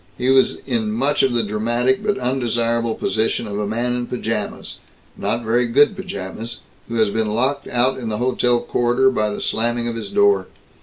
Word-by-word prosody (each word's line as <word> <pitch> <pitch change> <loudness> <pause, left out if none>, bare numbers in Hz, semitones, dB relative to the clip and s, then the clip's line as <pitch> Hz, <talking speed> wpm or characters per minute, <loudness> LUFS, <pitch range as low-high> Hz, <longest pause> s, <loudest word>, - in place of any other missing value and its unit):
He 125 +1 +1
was 135 0 +4
in 115 -5 -1
much 135 +7 +1
of 130 -3 +2
the 115 - +2
dramatic 120 +5 0
but 205 - 0
undesirable 120 - 0
position 110 +1 -1
of 105 -1 -4
a 105 - -1
man 120 +3 -1
in 120 -1 -3
pajamas, 115 -4 -4 0.4
not 120 - -2
very 120 +2 +2
good 205 - +4
pajamas, 115 - -6 0.3
who 115 - -5
has 110 -3 +2
been 110 0 0
locked 130 +6 0
out 125 +2 +1
in 115 -3 -4
the 105 - -2
hotel 120 0 +1
corridor 120 +2 +2
by 110 -4 0
the 105 - -4
slamming 120 +1 0
of 115 - -3
his 115 - -5
door. 410 0 +3
120 Hz, 190 wpm, -20 LUFS, 110-130 Hz, 0.4 s, was